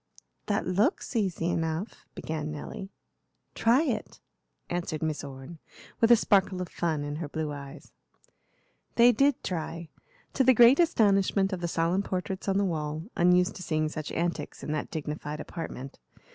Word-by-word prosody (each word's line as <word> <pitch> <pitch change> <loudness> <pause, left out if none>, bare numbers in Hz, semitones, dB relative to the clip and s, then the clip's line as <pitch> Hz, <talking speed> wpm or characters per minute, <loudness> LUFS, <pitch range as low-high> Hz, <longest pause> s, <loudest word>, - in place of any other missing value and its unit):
"That 205 - 0
looks 210 - 0
easy 190 -7 0
enough," 165 +5 -3
began 155 -1 -4
Nelly. 155 +5 -7 0.6
"Try 240 +7 +3
it," 235 -9 -3 0.5
answered 170 -3 -3
Miss 155 -2 -2
Orne, 140 +3 -9 0.4
with 230 - +4
a 240 - +9
sparkle 195 -4 +2
of 180 -2 -4
fun 160 -4 -1
in 145 0 -4
her 155 -2 -5
blue 155 0 -3
eyes. 140 -1 -9 1.0
They 240 +1 +7
did 275 +3 +2
try, 165 -2 -4 0.4
to 270 - +3
the 260 0 +6
great 240 +5 +7
astonishment 200 - +3
of 180 - -4
the 170 - -1
solemn 170 +3 +1
portraits 190 0 -4
on 195 0 +2
the 200 - +2
wall, 155 +3 -3
unused 180 +1 +4
to - - -9
seeing 155 -3 0
such 155 -1 -5
antics 170 -3 -3
in - - -3
that 155 -1 -2
dignified 150 -1 -5
apartment. 135 -6 -7
175 Hz, 160 wpm, -28 LUFS, 155-200 Hz, 1.0 s, a